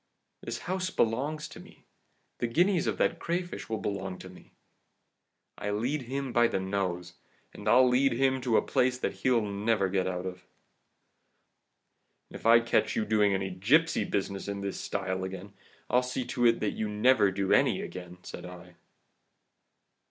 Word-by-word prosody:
This 115 0 -5
house 185 0 -1
belongs 145 +5 -1
to - - -11
me - - -16 0.5
the 120 - 0
guineas 175 +7 +2
of - - -1
that 170 - +1
crayfish 175 -4 -3
will 110 - -1
belong 95 -2 -4
to 95 - -10
me! 90 - -16 1.1
I 105 - -3
lead 120 +8 -1
him 130 +1 -4
by 120 0 +5
the 115 - -1
nose, 95 -2 -3 0.4
and 105 - -9
I'll 125 +3 +6
lead 130 +1 +3
him 130 +1 +1
to 120 -3 +2
a - - +3
place 125 0 +1
that - - -2
he'll 125 -3 +3
never 100 -1 0
get 95 -1 0
out 90 0 -3
of!' 90 -1 -5 1.9
"'And - - -11
if - - -3
I 115 +1 +7
catch 115 -1 +1
you 110 - 0
doing 105 -2 +3
any 95 0 -2
gipsy 125 - +2
business 100 -1 -3
in 100 0 -4
this 100 -1 -4
style 95 -1 -3
again, 95 +1 -7 0.3
I'll 125 - +3
see 125 0 -3
to 120 -1 +3
it 115 0 +2
that 105 - 0
you 110 -1 -3
never 105 0 +4
do 95 0 0
any - - +3
again!' 90 -1 -8
said - - -8
I. 90 0 -11
110 Hz, 175 wpm, -29 LUFS, 95-125 Hz, 1.9 s, I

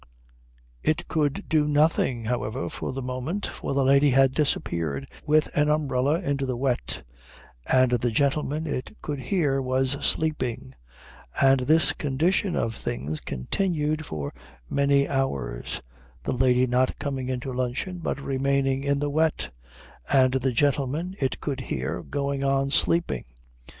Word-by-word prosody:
It 155 +2 0
could 145 -3 -1
do 150 -2 +2
nothing, 145 -5 +2
however, 120 +1 -2
for - - -4
the 135 0 -5
moment, 130 +10 -3
for 140 - -4
the 140 - +3
lady 140 +2 +5
had 135 0 +4
disappeared 85 - 0 0.2
with 155 +1 +2
an 150 0 +3
umbrella 145 0 +1
into 140 -5 -1
the 125 -2 -2
wet, 130 -1 -1 0.7
and 130 -1 +5
the 120 0 +1
gentleman, 145 +5 0
it 145 +6 -4
could 145 -2 -3
hear, 135 -1 +1
was 130 +1 0
sleeping; 125 - -1 0.7
and 135 0 +5
this 145 +2 +5
condition 160 +7 0
of 115 - 0
things 75 - -4
continued 155 - -1
for 70 -2 -4 0.3
many 140 - +2
hours, 70 - -2 0.4
the - - -1
lady 125 0 +3
not 125 +1 +1
coming 135 -3 -3
into 130 0 -3
luncheon 130 +9 -2
but 160 - -2
remaining 135 0 0
in 140 0 +1
the 145 +1 -1
wet, 155 - +1 0.6
and 130 -1 +5
the 130 0 +1
gentleman, 145 +7 0
it 135 -2 -1
could 140 -3 -3
hear, - - -3
going 140 -1 -2
on 135 0 +1
sleeping. 170 +5 +1
135 Hz, 140 wpm, -26 LUFS, 125-150 Hz, 0.7 s, lady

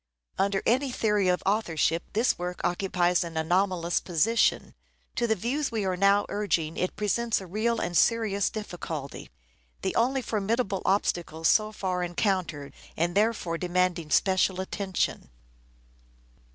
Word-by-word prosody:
Under 195 0 +1
any 260 +3 +2
theory 210 -5 +1
of 180 0 +1
authorship 170 -5 +1
this 225 +4 +2
work 180 0 -4
occupies 180 -1 +1
an 165 -1 -6
anomalous 175 +1 +1
position. 195 +7 +1 0.4
To 240 - 0
the 220 - +2
views 260 +8 -2
we 220 -3 -1
are 185 -1 0
now 200 +2 +3
urging 170 -6 -1
it 180 - -2
presents 220 +3 0
a 190 - -9
real 220 +6 -1
and 175 - -3
serious 215 -1 +2
difficulty: 170 -9 -6 0.5
the - - -1
only 260 +3 +1
formidable 210 -2 -1
obstacle 175 -4 0
so 215 +6 +3
far 185 -4 -2
encountered, 175 -5 -2 0.2
and 170 +2 0
therefore 205 -5 0
demanding 180 -2 0
special 190 +1 +2
attention. 190 - -2
190 Hz, 135 wpm, -27 LUFS, 175-215 Hz, 0.5 s, now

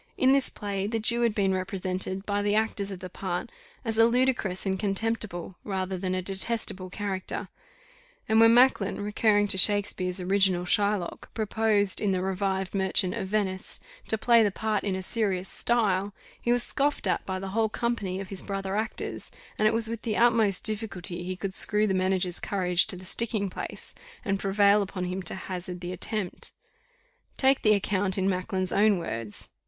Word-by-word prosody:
In 260 +1 +4
this 275 -1 +5
play, 200 -2 -3
the 225 +2 -1
Jew 235 +2 +3
had 230 -3 +1
been 195 -2 +2
represented, 185 0 -3
by 205 0 0
the 205 0 +1
actors 215 -2 0
of 190 -2 -7
the 185 - -5
part, 180 -1 -4 0.3
as 225 -1 0
a 225 - +8
ludicrous 240 -7 0
and 190 -1 -1
contemptible, 195 -3 -2
rather 190 -2 -3
than 185 0 -2
a 185 - -2
detestable 195 -1 -2
character; 190 -1 -4 0.8
and 220 0 +3
when 225 0 +7
Macklin, 240 -4 +4
recurring 205 0 +2
to 190 -2 +2
Shakespeare's 195 -2 +3
original 185 -1 +2
Shylock, 200 -1 0
proposed, 215 -2 +1
in 200 -2 +1
the 185 0 -1
revived 190 0 -2
Merchant 190 -1 +2
of 205 -4 -4
Venice, 190 -2 -2 0.3
to 220 - +2
play 235 +1 +5
the 210 - +3
part 215 +1 -2
in 195 -2 -1
a 190 - -4
serious 195 -3 -1
style, 205 -4 0 0.3
he 240 - 0
was 245 0 +2
scoffed 285 -3 0
at 180 -3 0
by 190 -1 -2
the 190 +1 -5
whole 220 +2 +1
company 210 -5 -2
of 195 -1 -7
his 195 - -3
brother 195 -1 -4
actors, 220 +1 -4 0.3
and 215 - +4
it - - +4
was 225 0 0
with 230 0 -5
the 220 -3 -2
utmost 225 -5 +3
difficulty 200 -5 0
he 185 +1 -4
could 190 +1 -4
screw 210 +2 +4
the 195 - 0
manager's 185 -1 0
courage 180 -3 +1
to 210 - +1
the 185 +1 -10
sticking 210 -1 -1
place, - - -7 0.3
and 195 -1 0
prevail 200 +1 +3
upon 190 -2 -4
him 180 +1 -3
to 185 - -4
hazard 180 -1 -6
the 180 +1 -5
attempt. 205 0 -4 0.8
Take 270 0 +3
the 215 -1 +5
account 195 -1 0
in 190 0 +1
Macklin's 185 0 -1
own 210 -1 +4
words. 115 -10 -3
195 Hz, 185 wpm, -27 LUFS, 185-215 Hz, 0.8 s, a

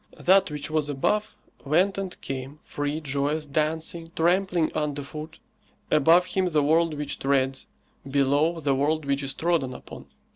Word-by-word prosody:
That 190 0 +4
which 150 0 -5
was 155 -2 0
above 210 +10 0 0.3
went 180 +7 +2
and 195 -2 -5
came, 135 +2 -6
free, 145 +2 -3
joyous, 145 +2 -1
dancing, 160 +3 -2
trampling 175 0 +2
under 145 -2 -2
foot; 155 +3 -8 0.5
above 165 +4 +5
him 190 0 0
the 155 -5 +2
world 160 +2 +2
which 145 -1 -4
treads, 135 -1 0 0.4
below 145 +4 +2
the 140 -3 +1
world 150 +3 0
which 140 0 0
is 135 -1 -2
trodden 160 -7 0
upon. - - -11
150 Hz, 150 wpm, -25 LUFS, 140-165 Hz, 0.5 s, above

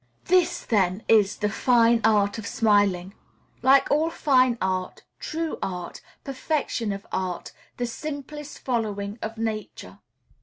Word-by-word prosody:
This, 365 -1 +2
then, 195 -2 +1
is 210 -3 +4
"the 210 - 0
fine 235 +1 +3
art 210 -1 +2
of 210 - -6
smiling;" 200 -4 +2 0.5
like 270 +2 +4
all 310 +3 +3
fine 255 -6 +3
art, 185 -1 -2 0.2
true 320 0 -4
art, 180 -2 -5 0.2
perfection 270 -5 -2
of 200 0 -6
art, 180 -2 -3 0.3
the 245 - -1
simplest 290 +3 -7
following 215 -4 -3
of 225 +1 -5
Nature. 220 -1 -5
225 Hz, 125 wpm, -25 LUFS, 200-265 Hz, 0.5 s, is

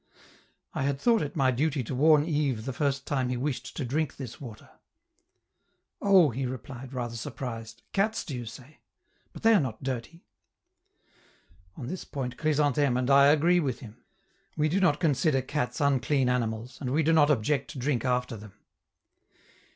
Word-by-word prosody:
I - - -3
had 135 0 0
thought 230 +3 +3
it 145 - -4
my 135 -4 +3
duty 140 +1 0
to 120 - -5
warn 150 +3 +5
Yves 140 -8 -1
the 135 - -3
first 140 -1 -1
time 130 -3 -1
he 125 - -1
wished 135 +1 -4
to 140 - -2
drink 145 +3 -2
this 125 -2 -8
water. 120 -6 -10 1.3
"Oh!" 190 -7 +5
he 130 +3 -3
replied, 130 0 -8
rather 120 -3 -4
surprised, 115 -1 -6
"cats, 215 +3 0
do 140 - -5
you 120 -2 -6
say? 130 +6 -12 0.5
But - - -12
they 225 0 +6
are 210 - +6
not 130 -7 -4
dirty!" 130 +6 -5 1.5
On - - -6
this 180 +8 -5
point 125 -4 -5
Chrysantheme 145 -3 +1
and 130 +2 0
I 140 0 +7
agree 165 +5 +4
with 135 -7 -2
him: 120 0 -12 0.5
we 155 0 +2
do 185 +5 +1
not 180 -7 +3
consider 140 -3 +2
cats 130 -3 -3
unclean 135 -1 +2
animals, 115 0 -2
and 130 - -2
we 150 +5 +1
do 165 +2 +3
not 150 -2 +5
object 135 +1 +1
to - - -9
drink 125 -2 -1
after 125 -2 0
them. 105 -2 -11
135 Hz, 175 wpm, -28 LUFS, 125-150 Hz, 1.5 s, I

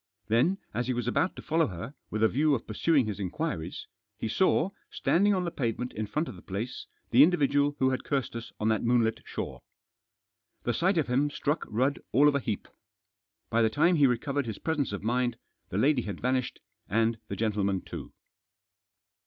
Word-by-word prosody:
Then, 125 - +3 0.2
as 120 +3 -1
he 130 - 0
was 120 -1 -2
about 165 +9 +1
to - - -9
follow 160 +1 +2
her, 100 - -7 0.2
with 110 +1 -1
a - - +7
view 145 +5 +2
of 115 - -5
pursuing 135 +5 +2
his 105 -2 -4
inquiries, 95 - -3 0.3
he - - -3
saw, 185 - +2 0.2
standing 200 +3 +2
on 185 - 0
the 170 - -2
pavement 125 -2 -2
in 110 0 -3
front 155 +9 -1
of 125 - -7
the 90 - -12
place, 105 +6 -5 0.2
the 125 - +7
individual 145 -3 +4
who 130 0 +3
had 130 - -2
cursed 135 -5 -2
us 115 0 -6
on 105 - 0
that 110 - +2
moonlit 115 -2 +2
shore. - - -5 1.0
The 120 - 0
sight 180 - +2
of 155 - +3
him 135 +4 +1
struck 145 +1 -1
Rudd 130 +6 0
all 145 +3 +6
of 145 - +4
a 140 - +2
heap. 110 -6 -3 0.8
By 115 0 +3
the 110 - +4
time 165 +10 +3
he 145 -2 +6
recovered 135 +2 -1
his 110 - -4
presence 155 -6 -1
of 100 -1 -5
mind, 120 +1 0 0.3
the 90 - -3
lady 135 +4 +3
had 100 -5 -5
vanished, 130 0 -1 0.3
and 115 +2 +1
the - - -4
gentleman 100 -3 0
too. - - -8
125 Hz, 195 wpm, -29 LUFS, 110-145 Hz, 1.0 s, a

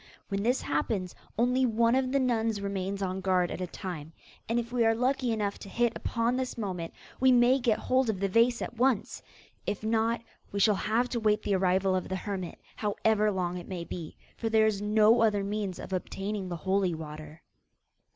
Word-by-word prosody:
When 200 -1 -1
this 245 +5 +1
happens, 180 +5 -1 0.2
only 250 +3 +2
one 230 -1 +3
of 260 0 +1
the 275 - +2
nuns 225 -4 +1
remains 200 0 -3
on 190 0 -2
guard 185 -2 +2
at - - -5
a 180 - -2
time, 165 -5 -7 0.4
and 230 - +1
if 235 0 -5
we 240 -2 +3
are 225 0 +4
lucky 255 +1 +1
enough 210 -2 -1
to 200 - -9
hit 235 +2 +1
upon 235 +1 0
this 260 -1 -3
moment, 185 -6 -4 0.3
we 260 0 +5
may 250 +2 +5
get 240 -4 +2
hold 255 -1 +1
of 205 -4 -1
the 195 - +1
vase 230 +4 +3
at 240 - -7
once; 245 -3 +1 0.5
if 205 - -2
not, 225 +1 +1 0.3
we 200 - -2
shall 210 +1 +5
have 225 +5 +1
to 240 - -1
wait 215 -1 +2
the 205 - 0
arrival 190 0 +2
of 185 - -2
the 190 - -1
hermit, 190 -2 -4 0.2
however 215 0 +1
long 180 -3 -1
it 175 - -10
may 180 -3 -4
be; 170 -2 -7 0.2
for 225 - -2
there 220 0 +4
is 210 -2 0
no 215 +2 +4
other 210 -3 +3
means 200 -2 -3
of - - -7
obtaining 195 +1 -3
the 175 - -3
holy 190 -2 +2
water. 155 0 -9
210 Hz, 205 wpm, -29 LUFS, 190-235 Hz, 0.5 s, we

